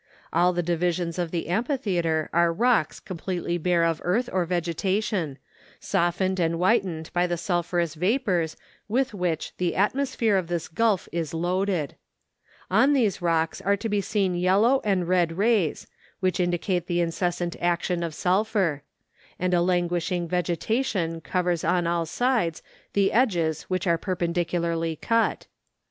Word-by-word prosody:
All 180 +1 +4
the 175 0 -1
divisions 175 0 -1
of 175 -2 -1
the 170 0 -3
amphitheatre 180 - 0
are 170 0 +4
rocks 240 +7 +1
com¬ 185 - -7
pletely 175 -1 -3
bare 175 0 +2
of 165 -1 0
earth 220 +8 0
or 185 -2 +1
vegetation, 175 -1 -1 0.4
softened 185 +1 0
and 165 -1 +1
whitened 180 -3 +1
by 175 0 +2
the 175 -1 -1
sulphurous 175 -2 -1
vapours 180 - 0 0.3
with 255 +3 0
which 180 -5 -2
the 180 -2 -1
atmosphere 230 0 +1
of 185 -3 -1
this 170 -2 -2
gulf 210 +1 +1
is 165 -2 -3
loaded. 180 -2 -1 0.8
On 280 +2 +5
these 225 -9 +1
rocks 165 -2 0
are 200 +2 +2
to 225 - -3
be 205 -2 0
seen 195 -2 0
yellow 195 +9 +3
and 190 -4 +1
red 175 -2 +2
rays, 205 -6 +1 0.3
which 185 -1 0
indicate 175 0 0
the 175 -1 0
incessant 175 0 -1
action 175 0 0
of 165 -3 -3
sulphur; 190 -5 +1 0.6
and 180 0 0
a 175 - +4
languishing 175 0 0
vegetation 180 - -1
covers 175 -1 -1
on 180 -1 +1
all 170 -1 0
sides 230 -6 0 0.3
the 200 -1 +3
edges 175 - +1
which 185 -1 -1
are 170 -2 +2
perpendicularly 170 -2 -1
cut. 230 +7 0
180 Hz, 145 wpm, -25 LUFS, 170-195 Hz, 0.8 s, On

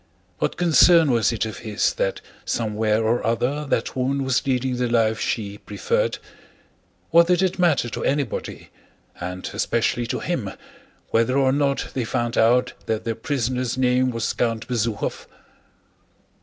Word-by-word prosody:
What - - -1
concern 170 -2 +5
was 115 -2 +2
it 110 -2 -1
of 110 - -6
his 110 -2 0
that - - -2 0.2
somewhere 110 0 0
or 120 +2 +1
other 125 +6 0
that - - -1
woman 135 +2 0
was 130 +1 0
leading 130 -1 0
the 125 -1 0
life 110 -2 +2
she 105 -2 -3
preferred? 475 +1 -1 0.9
What 170 0 +6
did 180 +1 +3
it 185 0 0
matter 165 -8 +3
to - - -5
anybody, 140 -3 -2 0.5
and 90 +1 -5
especially 120 +1 0
to - - -2
him, 125 - -3 0.6
whether 115 +4 +2
or 135 -1 +3
not 140 0 0
they 130 - -1
found 120 0 -2
out 125 +3 +3
that 110 -1 -1
their 115 - -1
prisoner's 125 0 -2
name 130 0 +2
was 115 -2 -2
Count 115 -2 -1
Bezúkhov? 115 -3 -2
125 Hz, 150 wpm, -23 LUFS, 115-140 Hz, 0.9 s, What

